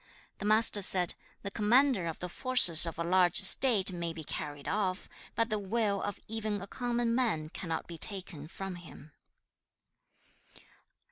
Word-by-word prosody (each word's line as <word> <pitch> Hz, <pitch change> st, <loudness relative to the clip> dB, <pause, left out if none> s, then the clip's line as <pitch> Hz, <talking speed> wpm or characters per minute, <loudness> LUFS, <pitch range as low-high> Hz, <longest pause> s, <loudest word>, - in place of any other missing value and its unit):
The -, -, -6 dB
Master 215 Hz, -1 st, +4 dB
said, 180 Hz, -2 st, +1 dB, 0.3 s
'The 200 Hz, -, -6 dB
commander 230 Hz, -2 st, +1 dB
of 165 Hz, -, -6 dB
the 180 Hz, -, -6 dB
forces 180 Hz, -6 st, +5 dB
of 165 Hz, -, -7 dB
a 170 Hz, -, -3 dB
large 175 Hz, 0 st, +2 dB
state 200 Hz, -1 st, +6 dB
may 170 Hz, -2 st, -5 dB
be 160 Hz, -1 st, -9 dB
carried 145 Hz, -1 st, -7 dB
off, 195 Hz, -2 st, -3 dB, 0.3 s
but 230 Hz, 0 st, -1 dB
the 215 Hz, -, -1 dB
will 205 Hz, 0 st, -2 dB
of 205 Hz, -, -6 dB
even 215 Hz, -1 st, -4 dB
a 195 Hz, -, -8 dB
common 240 Hz, +1 st, -3 dB
man 220 Hz, -12 st, -2 dB
cannot 165 Hz, -1 st, -6 dB
be 170 Hz, -2 st, -11 dB
taken 180 Hz, -7 st, -6 dB
from 190 Hz, +1 st, -8 dB
him.' 160 Hz, -3 st, -15 dB
195 Hz, 155 wpm, -29 LUFS, 170-220 Hz, 0.3 s, state